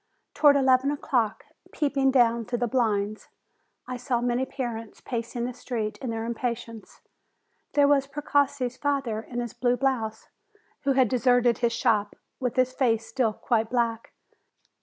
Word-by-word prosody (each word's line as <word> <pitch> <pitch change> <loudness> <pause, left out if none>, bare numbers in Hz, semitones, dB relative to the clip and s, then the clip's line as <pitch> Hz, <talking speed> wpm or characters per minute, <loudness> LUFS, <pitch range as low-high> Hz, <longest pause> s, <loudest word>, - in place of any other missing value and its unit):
Towards 290 -2 +5
eleven 265 0 +3
o'clock, 265 -6 -1 0.3
peeping 280 -3 +1
down 235 -3 +3
through 240 - -2
the 245 0 0
blinds, 215 -4 0 0.6
I 255 0 -5
saw 245 -1 -1
many 245 +2 0
parents 230 -5 -5
pacing 235 0 -4
342 - - 0
JULY 245 - -2
the 250 0 -16 0.3
street - - -16
in 255 - -2
their 225 0 -3
impatience. 235 -1 -5 0.7
There 285 -1 +5
was 280 -1 +3
Precossi's 280 -3 0
father, 275 -7 -1
in 240 +1 -5
his 240 -2 -5
blue 245 0 +1
blouse, 230 -5 -1 0.6
who 275 - +3
had 260 -2 +4
deserted 245 -1 +3
his 235 -1 +1
shop, 205 -3 +1 0.2
with 250 -3 -2
his 255 0 +2
face 230 -4 +1
still 225 -1 0
quite 225 0 0
black. 230 -2 -1
245 Hz, 160 wpm, -26 LUFS, 230-265 Hz, 0.7 s, Towards